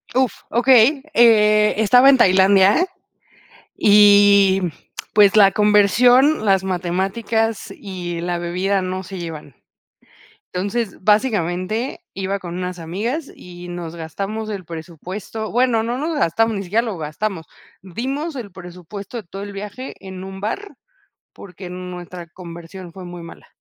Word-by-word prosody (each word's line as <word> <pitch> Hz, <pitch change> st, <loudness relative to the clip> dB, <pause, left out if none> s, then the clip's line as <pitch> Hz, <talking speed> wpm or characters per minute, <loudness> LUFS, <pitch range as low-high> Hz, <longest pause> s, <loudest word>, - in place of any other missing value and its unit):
Uf, 260 Hz, -2 st, 0 dB
okey. 255 Hz, +3 st, +4 dB
Eh, 215 Hz, -3 st, +5 dB
estaba 245 Hz, +5 st, +5 dB
en 275 Hz, -, +6 dB
Tailandia, 195 Hz, -, +4 dB, 0.9 s
y 205 Hz, -2 st, +6 dB, 0.5 s
pues, 205 Hz, -1 st, +5 dB
la 195 Hz, -2 st, +7 dB
conversión, 220 Hz, -, +4 dB
las 190 Hz, -1 st, +3 dB
matemáticas 195 Hz, +5 st, -2 dB
y 180 Hz, -4 st, -6 dB
la 175 Hz, 0 st, -2 dB
bebida 185 Hz, +3 st, -1 dB
no 185 Hz, +1 st, -4 dB
se 185 Hz, 0 st, -8 dB
llevan. 155 Hz, -5 st, -8 dB, 1.0 s
Entonces, 200 Hz, +4 st, -3 dB
básicamente, 210 Hz, -, 0 dB
iba 195 Hz, +1 st, -3 dB
con 175 Hz, -2 st, -7 dB
unas 180 Hz, 0 st, -5 dB
amigas, 225 Hz, -, -4 dB
y 175 Hz, 0 st, -12 dB
nos 175 Hz, -1 st, -7 dB
gastamos 195 Hz, +7 st, -5 dB
el 195 Hz, -3 st, -6 dB
presupuesto. 180 Hz, +6 st, -7 dB
Bueno, 240 Hz, -1 st, +2 dB
no 240 Hz, +2 st, -3 dB
nos 310 Hz, +3 st, -2 dB
gastamos, 225 Hz, -, +1 dB
ni 195 Hz, -, -3 dB
siquiera 210 Hz, +6 st, +1 dB
lo 220 Hz, -7 st, -5 dB
gastamos. 160 Hz, +3 st, -4 dB, 0.4 s
Dimos 270 Hz, -, -4 dB
el 230 Hz, -6 st, -7 dB
presupuesto 180 Hz, +4 st, -10 dB
de -, -, -7 dB
todo 195 Hz, +3 st, -8 dB
el 205 Hz, 0 st, -7 dB
viaje 210 Hz, +6 st, -7 dB
en 190 Hz, -1 st, -9 dB
un 190 Hz, 0 st, -9 dB
bar, 400 Hz, -, -5 dB, 0.6 s
porque, 185 Hz, -1 st, -11 dB
nuestra 180 Hz, -1 st, -8 dB
conversión, 170 Hz, +1 st, -11 dB
fue 185 Hz, +1 st, -10 dB
muy 175 Hz, -1 st, -9 dB
mala. 165 Hz, -, -13 dB
195 Hz, 135 wpm, -20 LUFS, 180-220 Hz, 1.0 s, la